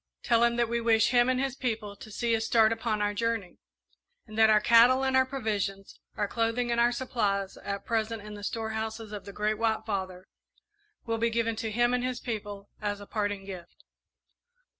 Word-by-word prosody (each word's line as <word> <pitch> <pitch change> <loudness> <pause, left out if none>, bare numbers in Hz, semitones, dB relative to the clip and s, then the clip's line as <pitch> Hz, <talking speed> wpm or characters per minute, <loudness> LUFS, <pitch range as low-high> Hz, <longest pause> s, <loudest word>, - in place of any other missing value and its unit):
Tell 235 -1 +3
him 235 0 +3
that 240 0 +1
we 235 +1 -1
wish 225 0 +4
him 245 0 +4
and 255 0 +1
his 270 -1 -1
people 220 -6 -3
to 215 - -12
see 230 +2 0
us 225 - -1
start 225 -1 +4
upon 220 -2 -1
our 205 0 0
journey, 225 -4 -2 0.7
and 215 - -11
that 220 0 +5
our 215 -1 +6
cattle 235 +4 +6
and 265 0 +1
our 260 0 +4
provisions, 205 -6 -3 0.2
our 205 - 0
clothing 230 +2 0
and 235 0 +2
our 240 0 +4
supplies, 210 -6 -1
at 200 0 -5
present 225 -1 -1
in 210 0 -9
the 205 0 -9
storehouses 220 0 -4
of 210 -2 -7
the 200 - -8
Great 210 +1 -1
White 220 -1 0
Father, 190 -3 -4 0.8
will 225 -1 -1
be 230 +1 +2
given 230 0 0
to 225 - -3
him 240 +3 +2
and 250 0 0
his 255 -1 -2
people 205 -4 -5
as 205 -1 -2
a 205 - -9
parting 205 -2 -2
gift. 180 -3 -10
225 Hz, 205 wpm, -28 LUFS, 205-235 Hz, 0.8 s, our